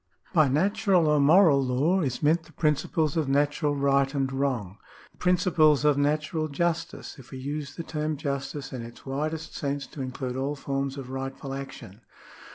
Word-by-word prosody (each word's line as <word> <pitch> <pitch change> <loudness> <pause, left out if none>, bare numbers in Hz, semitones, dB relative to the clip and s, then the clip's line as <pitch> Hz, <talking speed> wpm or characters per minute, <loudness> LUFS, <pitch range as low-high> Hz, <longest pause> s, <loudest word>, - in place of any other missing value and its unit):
By 155 -4 +5
natural 190 +4 +2
or 150 -1 +4
moral 150 0 +6
law 140 +9 +2
is 135 -2 -2
meant 160 +2 +3
the 165 - -17
principles 150 0 0
of 155 -4 0
natural 145 +1 +1
right 140 -1 +2
and 135 -1 0
wrong 125 -8 -2 0.2
— - - -22
the - - -30
principles 165 -5 +3
of 150 -1 +5
natural 155 +3 0
justice, 165 0 -3
if 120 -2 -14
we 130 - -8
use 145 +2 -5
the 165 - -5
term 155 -1 -3
justice 140 -1 -4
in 125 - -4
its 115 0 -11
widest 155 +4 -3
sense 140 -1 -2
to 140 - -9
include 130 -1 -4
all 140 +2 -1
forms 140 0 -3
of 130 -2 -7
rightful 135 +1 -5
action. 135 -6 -8
145 Hz, 175 wpm, -27 LUFS, 135-155 Hz, 0.2 s, moral